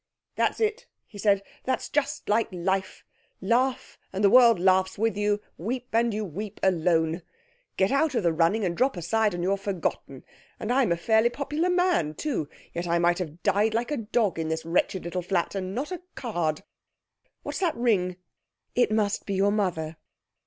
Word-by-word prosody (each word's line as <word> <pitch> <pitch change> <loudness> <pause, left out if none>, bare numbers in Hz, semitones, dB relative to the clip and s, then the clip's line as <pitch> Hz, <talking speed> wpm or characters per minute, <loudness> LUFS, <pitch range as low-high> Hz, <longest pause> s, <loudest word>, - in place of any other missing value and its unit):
'That's - - +1
it,' 440 +2 -1 0.2
he 205 - -13
said. 200 -1 +3 0.2
'That's 260 - -1
just 295 -1 -1
like 220 +2 +2
life; 190 +2 -2 0.4
"laugh, 250 +6 0
and 195 +2 -3
the 200 - +6
world 235 -5 +7
laughs 190 +1 +3
with 225 +1 +1
you; 205 0 +1 0.2
weep, 245 +7 -4
and 230 +1 +3
you 215 0 -2
weep 200 +4 -7
alone!" 165 -2 +2 0.6
Get 190 +1 +2
out 275 0 +2
of 230 - +1
the 170 -1 +2
running, 170 +6 +2
and 170 -1 -1
drop 260 +1 +1
aside, 210 +4 +1
and 175 - -3
you're 195 +2 +1
forgotten. 185 -8 -4 0.4
And 215 - -2
I'm 255 -7 +3
a 170 - +2
fairly 220 +6 +3
popular 295 +7 -1
man, 360 - +2
too; 240 - -2 0.2
yet 170 +1 -3
I 170 0 +2
might 175 +1 +2
have 170 -1 -6
died 210 +2 +2
like 240 +5 -1
a 295 - 0
dog 220 -5 0
in 160 - -1
this 160 0 -3
wretched 180 +3 0
little 175 +2 -3
flat, 175 -1 -1
and 190 0 -4
not 280 +8 -3
a 365 - -5
card. 175 - -2 0.8
What's - - -4
that 350 -5 +1
ring?' 190 -7 +1 0.6
'It 245 -3 +2
must 210 -2 0
be 200 - -1
your 200 +2 +3
mother.' 170 -6 -1
200 Hz, 185 wpm, -26 LUFS, 175-235 Hz, 0.8 s, world